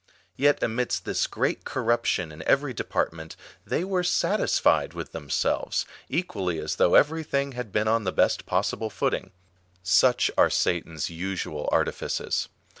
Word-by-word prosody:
Yet 145 +1 +2
amidst 120 +2 -1
this - - 0
great - - -1
cor 130 - -3
ruption 110 -8 +1
in 75 - -12
eveiy 135 -3 +2
department, 80 -5 -3 0.3
they - - 0
were 185 -1 0
satisfied 180 - +2
with - - -6
them 75 -3 -8
selves, - - 0 0.2
equally 100 - -2
as 75 0 -3
though 85 - +4
every 160 +2 +4
thing 140 -2 -1
had 125 -4 -6
been 105 +2 +1
on 115 0 +2
the 95 - -1
best - - +1
possible 100 +4 -1
footing. 105 - -1 0.5
Such 125 +6 +4
are - - +6
Satan's 80 -2 -1
usual 85 -3 -3
artifices. - - -1
110 Hz, 150 wpm, -26 LUFS, 85-135 Hz, 0.5 s, are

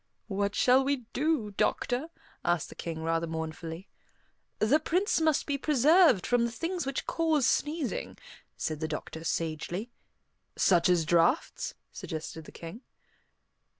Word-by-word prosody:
"What 200 0 -1
shall 255 +2 +5
we 270 -3 -1
do, 280 -7 0
doctor?" 245 +7 0 0.4
asked 175 -3 0
the - - -9
King 160 -1 -5
rather 165 +1 0
mournfully. 160 +2 -5 0.7
"The 230 +9 +3
Prince 355 +3 +1
must 315 -2 +2
be 280 -1 -1
preserved 300 - +5
from 245 -1 +2
the 235 - 0
things 330 +5 -3
which 275 - -2
cause 320 -5 +1
sneezing," 300 -3 -1 0.4
said 155 -1 -3
the 160 - -2
doctor 160 +1 -6
sagely. 165 +7 -3 0.6
"Such 175 -2 +4
as 175 -3 +3
draughts?" 245 - +1 0.2
suggested 160 -1 -6
the - - -11
King. 170 +8 -9
225 Hz, 135 wpm, -29 LUFS, -, 0.7 s, shall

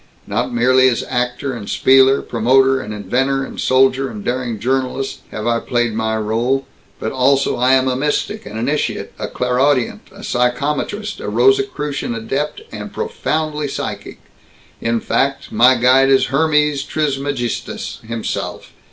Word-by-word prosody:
Not 115 +5 -2
merely 130 +2 +4
as 120 - -1
actor 125 +2 -2
and 110 -4 -7
spieler, 135 +1 +4
promoter 130 +3 +3
and 105 - -7
inventor 130 +7 0
and - - -8
soldier 130 +1 +3
and 105 -2 -8
daring 120 -2 -2
journalist, 130 +2 -1
have 110 - -6
I 120 0 +1
played 120 -2 -1
my 110 0 -1
rôle, 115 +5 0 0.4
but - - -3
also 135 +1 +2
I 125 +2 +3
am 130 0 +2
a 130 - +1
mystic, 145 +3 -1
an 105 +1 -7
initiate, 140 +7 -2
a - - -3
clairaudient, 125 +1 0
a - - -13
psychometrist, 150 - -1
a - - -4
Rosicrucian 395 - +1
adept, 135 - -3
and - - -7
profoundly 155 - -2
psychic 135 - -5 0.6
in 115 0 0
fact, 135 0 -1
my 130 +2 +5
guide 130 +2 +4
is 135 0 +3
Hermes 150 -1 +2
Trismegistus 140 -4 -3
himself! 115 0 -5
130 Hz, 145 wpm, -18 LUFS, 120-140 Hz, 0.6 s, my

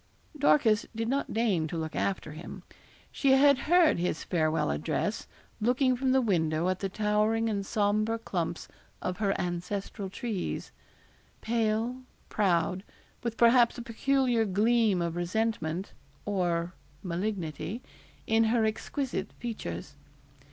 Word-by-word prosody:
Dorcas 260 -7 +3
did 225 0 -2
not 275 +3 -1
deign 205 -8 +1
to 165 - -4
look 160 -1 -4
after 195 -5 -1
him. 155 +3 -9 0.5
She 275 -2 +3
had 280 0 +6
heard 345 - +5
his 175 -2 -1
farewell 155 - +1
address, 75 +2 -2 0.3
looking 255 +3 +2
from 260 +1 0
the 265 0 +3
window 165 -4 +1
at 185 0 -1
the 195 - -2
towering 215 +3 +1
and 200 -1 -1
sombre 215 +2 +1
clumps 175 -7 -3 0.3
of 185 0 -3
her 200 -2 0
ancestral 190 +3 -3
trees 215 -2 -4 0.7
pale, 230 +2 0 0.3
proud, 180 -2 +1 0.4
with 235 -1 -3
perhaps 235 +1 +5
a 240 - -5
peculiar 245 0 +1
gleam 210 -1 +2
of 170 -1 -2
resentment 180 -1 -2 0.3
or 175 -3 0 0.3
malignity 185 - -3 0.4
in 225 0 +3
her 225 0 +2
exquisite 220 -1 -3
features. 85 - -6
210 Hz, 125 wpm, -29 LUFS, 175-235 Hz, 0.7 s, had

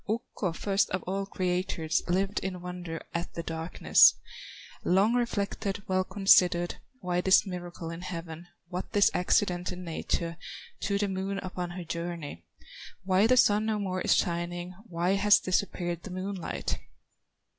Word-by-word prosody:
Ukko, 220 -4 -2
first 195 +3 +1
of 185 - -2
all 195 +1 -2
creators, 180 -4 -1
Lived 195 +3 +1
in 185 -1 -4
wonder 180 -2 -6
at 170 +1 -3
the 170 - -3
darkness; 165 +1 +4 0.7
Long 195 +6 +3
reflected, 205 -4 -1
well 185 0 +2
considered, 180 -3 +4 0.2
Why 180 0 0
this 190 +1 +5
miracle 175 -3 -6
in 165 +1 -7
heaven, 170 -2 -7 0.2
What 180 +1 -5
this 205 -1 +5
accident 180 0 +1
in 180 0 -7
nature 165 0 -2 0.4
To 200 -1 0
the 205 0 0
Moon 195 +1 -3
upon 180 -1 -4
her 175 +1 -6
journey; 170 - -5 0.6
Why 190 +3 +4
the 255 +2 +4
Sun 215 -2 +4
no 220 -1 +1
more 185 -2 -2
is - - +3
shining, 175 +1 -2
Why 175 -1 0
has 205 +1 +5
disappeared 175 -2 -1
the 195 - -9
moonlight. 185 0 -4
180 Hz, 145 wpm, -29 LUFS, 175-195 Hz, 0.7 s, this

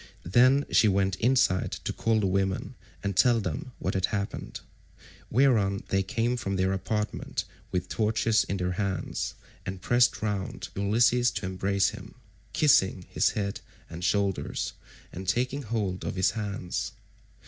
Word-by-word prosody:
Then 130 - +5
she 110 - +5
went 95 -1 +2
inside 120 -6 +2
to - - -2
call 115 -1 +1
the - - +1
women 95 0 0 0.3
and 100 -1 -2
tell 120 +4 +5
them 95 +5 -4
what 95 - -2
had 95 -1 +1
happened; 100 -2 -4 0.7
whereon 110 -7 +3
they 95 - +2
came 120 +4 0
from 100 -5 -2
their 95 0 +1
apartment 105 +3 -2 0.3
with 90 -1 -1
torches 110 0 +2
in 100 - -2
their 90 -1 -1
hands, 95 -1 -2 0.3
and 95 0 -5
pressed 120 +4 +2
round 100 -3 -3
Ulysses 120 +5 +3
to - - -3
embrace 95 +1 +1
him, - - -10 0.4
kissing 95 - +3
his - - +3
head 100 -1 -2 0.3
and 85 +2 -7
shoulders 100 +1 0 0.4
and 95 +1 -7
taking 125 +7 0
hold 105 -6 -2
of - - -3
his 95 0 +2
hands. 100 -5 -3
100 Hz, 150 wpm, -28 LUFS, 95-115 Hz, 0.7 s, Then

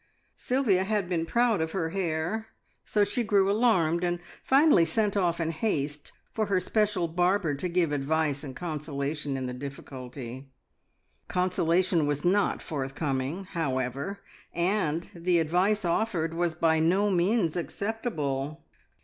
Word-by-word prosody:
Sylvia 240 -8 +1
had 205 -2 0
been 165 -2 -1
proud 235 -4 +2
of 160 0 -2
her 165 -4 -1
hair, 175 +4 -2 0.4
so 210 - +2
she 205 +5 -1
grew 200 -2 +3
alarmed, 180 -7 +3
and 175 0 0 0.2
finally 275 - +5
sent 210 +3 +1
off 175 -4 +1
in 165 -1 0
haste 150 -5 -2 0.2
for 215 -1 0
her 195 -2 +2
special 205 -2 +1
barber 175 0 +1
to 160 +6 -3
give 170 -3 +1
advice 145 0 0
and 135 -3 -7
consolation 150 -3 -3
in 130 - -3
the 125 - -4
difficulty. 130 -1 -8 0.8
Consolation 180 -2 +1
was 145 +1 -1
not 200 +3 +2
forthcoming, 140 +3 -2
however, 140 +4 -2 0.3
and 170 -2 0
the 175 0 +1
advice 180 +6 +2
offered 170 -3 0
was 170 -1 0
by 160 0 +3
no 190 +6 +3
means 180 -1 +2
acceptable. 165 - -3
170 Hz, 135 wpm, -28 LUFS, 150-195 Hz, 0.8 s, finally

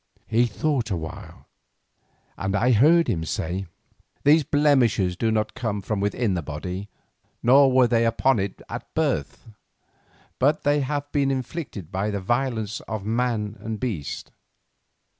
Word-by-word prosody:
He 120 +2 +2
thought 125 0 -1
a 95 - 0
while, 80 -1 -9 0.9
and 95 +2 -2
I 120 +5 +3
heard 155 +9 +5
him 90 -9 -1
say: 90 +4 -3 0.6
"The 155 +3 +6
blemishes 130 - +2
do 115 +5 0
not 110 -1 0
come 110 -4 -2
from 105 +1 -2
within 105 +1 0
the 90 - -1
body, 90 +7 -6 0.5
nor 135 +2 +6
were 130 -1 +5
they 115 -1 +2
upon 115 +1 +2
it 95 0 -4
at - - -8
birth, - - -1 0.9
but 145 +4 +2
have 145 0 0
been 140 -2 +1
inflicted 130 - -4
by 100 +2 -1
the 100 -1 -2
violence 110 0 -1
of 110 -3 -4
man 110 -2 -1
and 110 -1 -5
beast." 100 - -4
115 Hz, 140 wpm, -24 LUFS, 100-135 Hz, 0.9 s, The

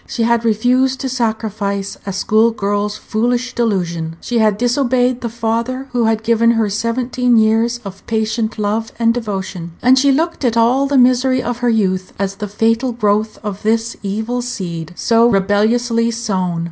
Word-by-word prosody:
She 235 - -2
had 235 0 +2
refused 250 +4 +2
to 265 - -2
sacrifice 220 -5 -2
a - - -1
school 215 +4 +2
girl's 205 -1 -2
foolish 245 +3 -1
delusion; 170 -8 -1
she 240 -1 -2
had 215 -2 +2
disobeyed 245 +1 +1
the 235 - -3
father 235 +4 -2
who 240 -2 +1
had 220 0 0
given 230 0 +3
her 215 -3 +1
seventeen 245 +3 0
years 225 +2 +2
of 195 0 -9
patient 220 0 -1
love 215 +2 -2
and 230 0 +2
devotion; 190 -7 -5
and 255 +1 +4
she 280 +1 +4
looked 325 +3 -1
at 235 -2 +1
all 250 +4 +3
the 280 0 +1
misery 255 0 +3
of 245 -1 -3
her 245 -1 +1
youth 185 -5 0
as 195 0 -3
the 210 - -4
fatal 230 +4 0
growth 215 -1 0
of 205 -2 -5
this 225 +1 0
evil 220 +5 -2
seed, 175 -9 -5
so 230 +3 +3
rebelliously 230 +4 +1
sown. 190 -7 -2
225 Hz, 170 wpm, -17 LUFS, 205-245 Hz, -, and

